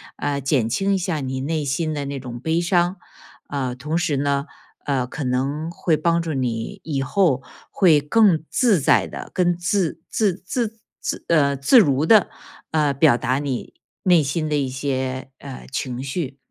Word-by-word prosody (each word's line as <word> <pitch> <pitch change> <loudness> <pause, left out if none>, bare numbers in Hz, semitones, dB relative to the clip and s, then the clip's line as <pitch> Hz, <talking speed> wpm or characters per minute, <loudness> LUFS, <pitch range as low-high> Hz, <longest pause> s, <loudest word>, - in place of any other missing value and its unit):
呃， 140 -1 -2
减 135 -4 +1
轻 195 - +1
一 - - +2
下 175 -4 -2
你 130 -1 -3
内 155 +1 -2
心 155 +3 -1
的 145 -1 -3
那 140 0 -4
种 120 -2 -7
悲 160 +6 0
伤。 175 +1 +2 0.5
啊， 130 -3 -3
同 150 +6 -2
时 175 -4 0
呢， 140 0 0 0.4
呃， 135 -3 0
可 145 +3 -5
能 135 +5 -1
会 170 -1 +1
帮 170 +2 +1
助 165 -2 -3
你 120 -4 -3
以 145 -4 -2
后 135 -3 +1 0.3
会 165 -6 +4
更 170 +1 +3
自 220 -9 +3
在 - - +3
地、 - - -8
更 175 -2 +2
自 170 -2 -1
自 210 -4 +1
自 225 +1 -2 0.2
自 - - -3
呃， 140 -4 +3
自 140 - +5
如 145 -5 +3
地， 215 +2 +6 0.4
呃， 150 -3 +2
表 140 -3 +4
达 130 +3 0
你 140 -4 -4 0.3
内 180 -4 +5
心 155 +3 -1
的 150 - 0
一 140 -2 0
些， 130 -1 -3
呃， 135 -2 -9
情 130 -2 -3
绪。 140 0 -4
145 Hz, 190 characters per minute, -22 LUFS, 135-170 Hz, 0.5 s, 地